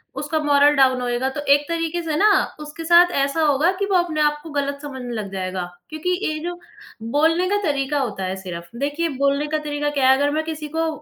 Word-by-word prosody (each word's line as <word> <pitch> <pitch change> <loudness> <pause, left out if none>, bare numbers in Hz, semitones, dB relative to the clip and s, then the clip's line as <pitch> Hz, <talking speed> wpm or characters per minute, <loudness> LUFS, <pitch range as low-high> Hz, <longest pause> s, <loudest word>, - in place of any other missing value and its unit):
उसका 295 +3 -2
moral 290 0 +4
down 260 -2 +3
होएगा। 245 +1 -1
तो 280 +2 -5
एक 290 +1 +2
तरीके 335 0 -2
से 315 -2 -2
ना 420 +5 +5 0.3
उसके 300 +2 -8
साथ 345 +2 +6
ऐसा 280 +4 -2
होगा 300 +3 +3
कि 400 - +1
वो - - +3
अपने 335 -3 0
आप 295 0 +2
को 330 - -9
गलत 280 -1 -2
समझने 260 -4 -6
लग 210 -4 -5
जाएगा, 185 -1 -3 0.3
क्योंकि 310 +3 -4 0.2
ये 310 0 -2
जो 350 0 -5 0.6
बोलने 325 +4 +3
का 410 - +2
तरीका 285 -3 0
होता 215 -8 -3
है 185 0 -2
सिर्फ़। 180 +2 -8
देखिए 290 +4 -1
बोलने 280 +2 +1
का 310 +1 -1
तरीका 295 -1 -2
क्या 275 -3 +2
है, 265 - +7
अगर 285 +1 +1
मैं 310 +2 -1
किसी 315 -1 -5
को 325 0 +1
290 Hz, 225 wpm, -21 LUFS, 265-320 Hz, 0.6 s, है